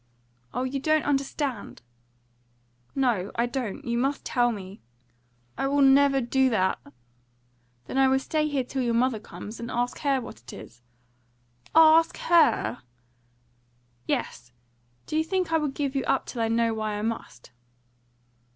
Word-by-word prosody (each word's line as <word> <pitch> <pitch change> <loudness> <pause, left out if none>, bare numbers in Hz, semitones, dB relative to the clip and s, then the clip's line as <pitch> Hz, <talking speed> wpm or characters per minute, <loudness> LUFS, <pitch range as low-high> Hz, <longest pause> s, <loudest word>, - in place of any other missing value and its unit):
"Oh, 250 - -2
you 265 +2 -2
don't 310 +2 +1
understand!" 275 - -2 1.1
"No, 240 -8 0
I 235 - +1
don't. 245 -4 -4
You 235 0 -1
must 275 +3 -1
tell 240 -1 +2
me." 195 -2 -8 0.8
"I 270 - +1
will 285 +1 +2
never 275 0 +5
do 265 +1 +2
that." 190 -5 +1 1.1
"Then 265 - -2
I 270 - +5
will 265 0 +3
stay 305 +3 -1
here 280 -3 -1
till 265 +2 -4
your 235 -2 0
mother 240 -1 +1
comes, 215 +1 -10
and 235 - -6
ask 245 +1 -2
her 275 -2 +1
what 175 - -10
it 120 - -12
is." 120 +1 -12 0.9
"Ask 320 0 +6
HER?" 325 - +3 1.3
"Yes! 120 - -3 0.5
Do - - -5
you 315 - +2
think 365 0 -1
I 325 - +3
will 300 - -1
give 280 0 -3
you 270 - 0
up 270 - +1
till 240 - -5
I 225 - +1
know 230 0 +1
why 215 -1 -3
I 210 - -4
must?" 225 - -5
260 Hz, 155 wpm, -26 LUFS, 230-280 Hz, 1.3 s, Ask